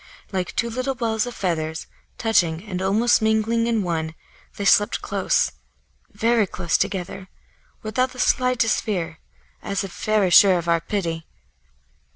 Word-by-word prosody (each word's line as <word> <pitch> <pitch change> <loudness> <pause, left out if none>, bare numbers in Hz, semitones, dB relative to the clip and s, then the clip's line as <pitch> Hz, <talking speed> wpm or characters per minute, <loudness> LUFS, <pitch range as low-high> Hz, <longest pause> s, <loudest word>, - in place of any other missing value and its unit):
Like 185 -2 -3
two 235 0 -1
little 255 +3 -2
balls 225 -2 -1
of 245 - -7
feathers, 160 -3 -2 0.3
touching 175 -7 +1
and 185 -4 -5
almost 220 +6 +3
mingling 220 +1 +1
in 225 -3 +1
one, 160 -2 -3 0.4
they 200 - -3
slept 205 +2 +3
close, - - +1 0.6
very 230 -3 +2
close 170 -1 -2
together, 190 0 -2 0.5
without 255 +4 0
the 255 - -13
slightest 250 -3 +2
fear, 170 -7 -3 0.4
as 200 -1 -2
if 195 - -7
very 215 -4 +2
sure 190 0 +7
of 170 -1 -4
our 170 -1 +2
pity. 165 -4 -3
205 Hz, 145 wpm, -22 LUFS, 175-230 Hz, 0.6 s, sure